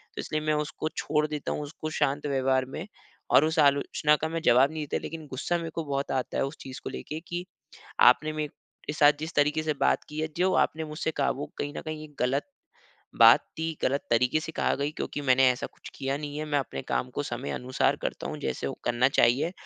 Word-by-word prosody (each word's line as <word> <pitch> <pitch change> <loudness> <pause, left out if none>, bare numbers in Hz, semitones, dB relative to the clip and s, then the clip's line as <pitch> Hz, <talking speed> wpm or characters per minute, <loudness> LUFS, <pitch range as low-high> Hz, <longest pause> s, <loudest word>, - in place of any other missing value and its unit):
तो - - -3
इसलिए 155 - -2
मैं 155 0 +1
उसको 150 +1 -4
छोड़ 150 0 +1
देता 150 -1 -4
हूँ - - -2
उसको 155 +1 -6
शांत 140 +2 +1
व्यवहार 130 -1 +1
में 175 - -5 0.4
और 150 - +7
उस 160 +1 0
आलोचना 145 +1 +3
का 160 - +1
मैं 165 0 -3
जवाब 135 -2 +5
नहीं 155 -1 -4
देता - - -2
लेकिन 160 -1 -7
गुस्सा 140 +6 -1
मेरे 165 -1 -4
को 165 - -1
बहुत 140 0 -1
आता 130 -1 -2
है - - +2
उस 140 +3 -7
चीज़ 130 -1 -8
को - - -4
लेके 150 - -6
कि 175 +1 -4 0.7
आपने 155 +1 0
मेरे 150 -1 -7
साथ 145 -1 +6
जिस 160 +2 -5
तरीक़े 150 +2 +2
से 155 -1 0
बात - - +2
की 150 +1 -5
है 155 - -1
जो 185 +2 +2
आपने 160 +1 -7
मुझसे 155 +1 -3
काबू 145 +2 -1
कहीं 145 +1 -3
न - - -3
कहीं 155 -1 -5
ये - - -18
ग़लत, 135 +3 +1 0.7
बात - - +8 0.2
थी 160 0 -2
ग़लत 140 +2 +1
तरीक़े 125 +5 +3
से 160 - -6
कहा - - +1
गयी 140 +2 -1
क्योंकि 145 - -4
मैंने 130 +1 +6
ऐसा 125 - -4
कुछ - - -13
किया 135 0 -2
नहीं 145 0 -6
है। 155 - -3
मैं 145 -1 +1
अपने 70 - -4
काम 65 - 0
को - - -3
समय 70 - -4
अनुसार 125 - 0
करता - - -3
हूँ - - -5
जैसे 65 - -2
वो - - -3
करना 120 +1 +3
चाहिए। 135 +5 +3
150 Hz, 230 wpm, -28 LUFS, 135-155 Hz, 0.7 s, बात